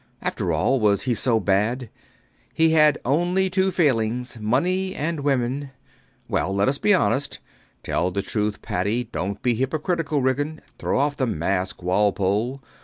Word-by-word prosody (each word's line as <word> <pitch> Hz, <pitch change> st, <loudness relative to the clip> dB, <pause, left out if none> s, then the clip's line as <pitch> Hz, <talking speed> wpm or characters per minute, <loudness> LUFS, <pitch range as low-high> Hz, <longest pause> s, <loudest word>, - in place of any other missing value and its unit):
After -, -, -2 dB
all, 135 Hz, 0 st, +2 dB
was 105 Hz, -3 st, +2 dB
he 125 Hz, -, +1 dB
so 115 Hz, 0 st, +2 dB
bad? 105 Hz, +5 st, 0 dB, 0.6 s
He 160 Hz, 0 st, +4 dB
had 150 Hz, -2 st, +5 dB
only 175 Hz, +7 st, +1 dB
two 190 Hz, +1 st, +2 dB
failings: 125 Hz, -8 st, 0 dB
money 185 Hz, -, 0 dB
and 160 Hz, +2 st, -2 dB
women. 135 Hz, 0 st, -1 dB, 0.6 s
Well, -, -, -1 dB
let 100 Hz, 0 st, +2 dB
us 135 Hz, +1 st, 0 dB
be 210 Hz, -, +2 dB
honest. 140 Hz, -7 st, +1 dB, 0.5 s
Tell 90 Hz, -, 0 dB
the 100 Hz, +2 st, -3 dB
truth, 105 Hz, -1 st, -2 dB
Paddy. 105 Hz, +7 st, -1 dB
Dont 100 Hz, -4 st, -4 dB
be 125 Hz, -, +3 dB
hypocritical, 155 Hz, -, -1 dB
Ridgeon. 145 Hz, +4 st, -1 dB, 0.2 s
Throw -, -, 0 dB
off 140 Hz, +1 st, +1 dB
the 130 Hz, -, 0 dB
mask, 95 Hz, -2 st, -2 dB
Walpole. 105 Hz, +7 st, 0 dB
130 Hz, 150 wpm, -23 LUFS, 105-150 Hz, 0.6 s, had